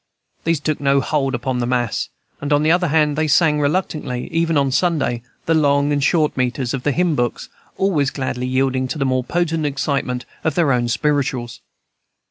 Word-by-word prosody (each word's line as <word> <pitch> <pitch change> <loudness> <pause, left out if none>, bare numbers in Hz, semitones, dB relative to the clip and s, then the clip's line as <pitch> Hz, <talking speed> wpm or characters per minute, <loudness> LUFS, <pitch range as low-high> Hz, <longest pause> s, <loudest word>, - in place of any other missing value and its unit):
These 165 -2 +1
took 155 0 -2
no 140 0 +3
hold 135 -1 0
upon 125 0 -2
the 120 - -1
mass; 120 -3 -1 0.3
and, 145 +1 -3
on 145 0 +3
the 155 - +4
other 180 +1 +3
hand, 150 -1 +2
they 155 +1 0
sang 150 0 +3
reluctantly, 145 -5 -1
even 165 -1 +1
on 140 -1 +2
Sunday, 140 -6 +1 0.2
the 165 - +2
long 145 -2 +3
and 145 -1 0
short 155 +1 +2
metres 125 -1 -1
of 135 - -2
the 145 - +1
hymn 175 +3 +1
books, 120 -4 -2 0.3
always 165 -8 +1
gladly 130 -2 -3
yielding 130 0 0
to 130 - -4
the 135 - 0
more 130 -1 +1
potent 165 +1 -1
excitement 135 -3 -2 0.2
of 160 -3 0
their 155 -6 +3
own 120 -1 +1
"spirituals." 125 -2 -1
140 Hz, 190 wpm, -20 LUFS, 130-155 Hz, 0.3 s, the